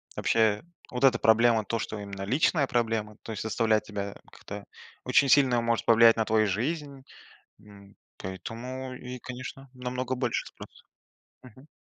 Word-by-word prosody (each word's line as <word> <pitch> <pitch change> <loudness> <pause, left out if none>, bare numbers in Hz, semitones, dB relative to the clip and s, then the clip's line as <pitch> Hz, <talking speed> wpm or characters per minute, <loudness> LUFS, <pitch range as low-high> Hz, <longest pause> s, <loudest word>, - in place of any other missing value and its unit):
вообще 110 -2 +2 0.3
вот 125 +1 -4
эта 130 -3 +6
проблема, 110 0 +4
то, 115 +3 -2
что 110 - -4
именно 100 -1 -7
личная 140 - +2
проблема, 110 -3 -1
то - - -7
есть 105 - -5
заставляет 110 -1 +1
тебя 100 -1 -5 0.2
как-то - - -9 0.4
очень 140 - +4
сильно, 130 -4 +5
может 115 -1 0
повлиять 115 0 +6
на 110 - +1
твою 110 0 +3
жизнь. 140 - -3 0.6
М, 100 -1 -16 0.2
поэтому 125 +7 -6
и, 125 0 -8
конечно, 130 +2 -8
намного 125 0 -3
больше 125 -2 -1
спрос. - - -13 0.6
Мгм. 130 +3 -16
115 Hz, 145 wpm, -28 LUFS, 110-130 Hz, 0.6 s, эта